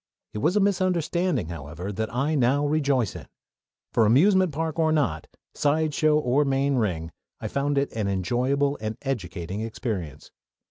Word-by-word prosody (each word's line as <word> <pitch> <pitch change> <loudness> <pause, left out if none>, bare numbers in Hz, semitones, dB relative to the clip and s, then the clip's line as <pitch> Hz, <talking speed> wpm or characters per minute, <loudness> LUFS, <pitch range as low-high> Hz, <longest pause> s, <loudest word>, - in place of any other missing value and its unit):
It 105 - -4
was 160 - +1
a - - +4
misunderstanding, 180 - +1
however, 85 +3 -6
that 110 +2 -3
I 135 +6 0
now 140 +1 +2
rejoice 140 -7 +1
in; - - -9 0.7
for, 115 -2 +4
amusement 185 - +4
park 160 +2 -3
or 160 -1 +3
not, 125 - 0 0.3
sideshow 155 0 +2
or 140 0 +2
main 135 0 +1
ring, 85 -8 -1 0.3
I - - -4
found 140 +1 -1
it 140 0 0
an 110 -3 -2
enjoyable 125 +9 0
and 110 0 -4
educating 95 -7 -4
experience. 110 - -5
135 Hz, 150 wpm, -25 LUFS, 105-155 Hz, 0.7 s, a